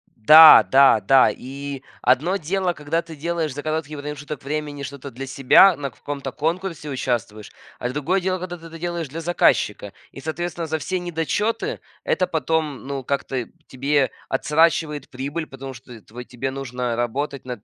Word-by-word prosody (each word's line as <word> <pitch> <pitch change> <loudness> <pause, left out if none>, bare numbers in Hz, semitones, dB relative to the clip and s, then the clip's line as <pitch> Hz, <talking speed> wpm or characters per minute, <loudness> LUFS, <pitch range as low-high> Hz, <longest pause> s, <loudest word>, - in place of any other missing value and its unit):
Да, 155 +2 +9
да, 135 -5 +6
да. 135 +2 +5
И 140 +1 -7 0.2
одно 150 +10 +2
дело, 185 +2 -1
когда 150 +2 -2
ты 165 -1 -11
делаешь 160 -1 -2
за 145 - -6
короткий 155 -1 -3
промежуток 145 0 -7
времени 145 0 -4
что-то 140 0 -8
для 135 +3 -7
себя, 135 +8 +6
на 140 -2 -4
каком-то 140 +2 -6
конкурсе 165 -1 -3
участвуешь, 120 -6 -3 0.3
а 125 - -2
другое 150 +8 -1
дело, 185 0 -1
когда 175 0 -6
ты 165 - -15
это 165 0 -11
делаешь 170 -3 -4
для 165 +5 -6
заказчика. 105 - +1 0.2
И 135 - -11
соответственно 165 +2 -4
за 160 - -1
все 185 +4 -2
недочеты 180 - -2 0.2
это 185 - 0
потом, 155 -4 -2
ну, 140 -1 -4
как-то 135 -2 -2 0.2
тебе 135 +1 +1 0.2
отсрочивает 150 0 +1
прибыль, 140 +5 -4
потому 135 0 -8
что 120 -2 -13
твой 120 +4 -10
тебе 130 +2 -5
нужно 125 -3 -4
работать 130 +4 -3
над 125 -5 -7
145 Hz, 165 wpm, -22 LUFS, 130-165 Hz, 0.3 s, Да